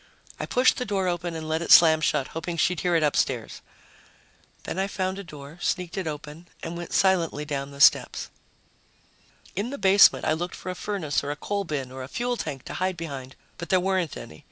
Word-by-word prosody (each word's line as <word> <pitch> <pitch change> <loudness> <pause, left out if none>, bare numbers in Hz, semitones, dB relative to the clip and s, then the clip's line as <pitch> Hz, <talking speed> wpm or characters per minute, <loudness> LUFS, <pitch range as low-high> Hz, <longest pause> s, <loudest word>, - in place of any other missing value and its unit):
I - - -3
pushed 250 +1 +3
the - - -1
door 195 -3 -1
open 175 -1 -2
and 160 -1 -5
let 160 +1 -1
it 170 - -5
slam 160 -2 +8
shut, 135 -3 0
hoping 170 +1 -5
she'd 180 +2 +1
hear 175 -1 +1
it 165 - +3
upstairs. 130 -5 0 1.0
Then 185 - -4
I 195 - +1
found 190 -1 -3
a - - -6
door, 150 -1 -11
sneaked 180 -2 -2
it 190 -4 -3
open 150 +2 -7 0.2
and 165 +1 -5
went 175 0 -7
silently 170 -6 +2
down 140 -2 -3
the 140 0 -12
steps. - - +4 1.2
In 205 +6 -2
the 280 - -5
basement, 195 -3 +6
I 155 - +2
looked 175 +3 -4
for 185 - -6
a - - -6
furnace 180 -9 -2
or 140 - -4
a 145 - -2
coal 200 +6 -3
bin 140 -6 -4
or 130 0 -7
a 130 - -6
fuel 245 - -2
tank 145 - -5
to - - -8
hide 185 0 -1
behind, 140 -5 -7 0.2
but 170 - -6
there 185 - +4
weren't 185 -4 -1
any. 80 - -10
170 Hz, 215 wpm, -25 LUFS, 150-185 Hz, 1.2 s, slam